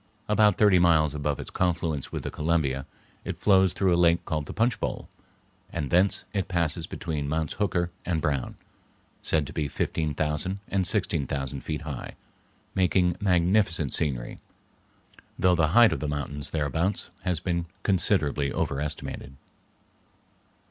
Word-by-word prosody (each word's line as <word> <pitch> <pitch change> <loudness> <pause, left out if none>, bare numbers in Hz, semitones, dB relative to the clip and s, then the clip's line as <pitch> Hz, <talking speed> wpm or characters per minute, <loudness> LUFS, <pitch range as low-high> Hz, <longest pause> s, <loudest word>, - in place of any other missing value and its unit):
About 105 -1 +4
thirty 100 -4 +5
miles 80 -4 +4
above 75 -1 -2
its - - -7
confluence 85 -5 -1
with - - -4
the - - -4
Columbia 75 -4 0 0.4
it - - -5
flows 95 -3 +4
through 95 -1 +2
a 85 0 +3
lake 85 0 +3
called 75 -3 -2
the - - -5
Punch 115 +3 +1
Bowl, - - -3 0.6
and 75 -5 -3
thence 90 +3 +3
it 100 -3 -1
passes 85 -2 -1
between 75 -5 -4
Mounts 80 -1 -1
Hooker 90 -4 0
and 85 -3 -1
Brown, 70 -4 -1 0.7
said 80 -2 0
to - - -9
be 75 - -1
fifteen 75 +2 -2
thousand 80 +6 -1
and 95 -2 +1
sixteen 90 - 0
thousand 70 0 -3
feet 75 -1 -4
high, 75 -5 -6 0.6
making 90 -1 +2
magnificent 90 - +2
scenery; 65 -6 0 1.0
though 90 -1 +4
the 80 -2 +3
height 120 -2 +7
of - - -3
the 75 - -3
mountains 70 0 -4
thereabouts 80 +5 -1
has 90 -4 0
been 85 -1 -2 0.2
considerably 80 -7 +1
overestimated. 70 -1 -3
85 Hz, 150 wpm, -27 LUFS, 75-90 Hz, 1.0 s, height